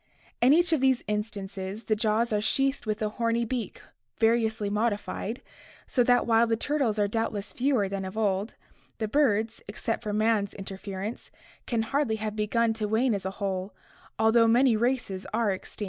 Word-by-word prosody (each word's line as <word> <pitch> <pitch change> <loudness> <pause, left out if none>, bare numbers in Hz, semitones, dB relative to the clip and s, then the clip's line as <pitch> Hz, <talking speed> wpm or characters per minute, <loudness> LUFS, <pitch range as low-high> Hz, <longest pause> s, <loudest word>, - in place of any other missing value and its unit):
In 245 +3 +6
each 340 +2 +4
of 305 - +2
these 265 -2 +3
instances 205 -1 -4
the 215 - +1
jaws 220 +1 +1
are 210 - +1
sheathed 270 +3 0
with 215 0 -1
a 210 - 0
horny 230 +2 0
beak 240 0 -4 0.3
variously 225 -2 +2
modified, 210 +1 -2 0.4
so 250 - +2
that 245 0 +3
while 230 0 +4
the 225 0 +1
turtles 270 -4 0
are 205 -1 +2
doubtless 210 -1 -3
fewer 250 -6 +1
than 195 0 -4
of 190 +3 -6
old, 205 -1 0 0.4
the 220 - -2
birds, 225 -4 +1
except 215 +2 -3
for 215 -3 -3
man's 215 -1 +1
interference, 195 +2 -6 0.4
can 230 -2 0
hardly 275 -1 0
have 215 -1 -4
begun 225 +2 +1
to 220 -1 -2
wane 225 +3 +2
as 195 -2 -3
a - - 0
whole, 195 -1 -3 0.4
although 225 +1 +4
many 240 +1 +4
races 230 -5 -1
are 225 -3 +2
extinct. 190 - -7
220 Hz, 175 wpm, -27 LUFS, 205-235 Hz, 0.4 s, In